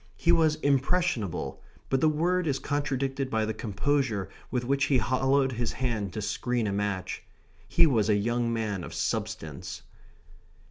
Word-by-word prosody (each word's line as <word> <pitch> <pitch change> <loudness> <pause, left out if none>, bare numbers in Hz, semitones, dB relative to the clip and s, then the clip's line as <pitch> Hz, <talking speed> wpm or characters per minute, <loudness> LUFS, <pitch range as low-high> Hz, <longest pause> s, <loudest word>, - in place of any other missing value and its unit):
He 170 - +3
was 160 -3 +4
impressionable; 140 - 0 0.3
but 135 0 +1
the 155 - +5
word 175 +3 +1
is 140 -2 +1
contradicted 135 -2 -1
by 110 -3 +1
the 110 - -2
composure 110 -1 0 0.2
with 125 -1 -1
which 140 +2 +2
he 135 - +3
hollowed 130 +2 +2
his 120 -1 -2
hand 115 -7 -1
to 110 - -3
screen 120 +2 -1
a 100 - 0
match. 100 -2 -2 0.5
He - - +5
was 115 -8 +2
a 105 - +5
young 120 +3 0
man 105 -5 -2
of - - -7
substance. 75 -4 -3
125 Hz, 155 wpm, -28 LUFS, 110-140 Hz, 0.5 s, the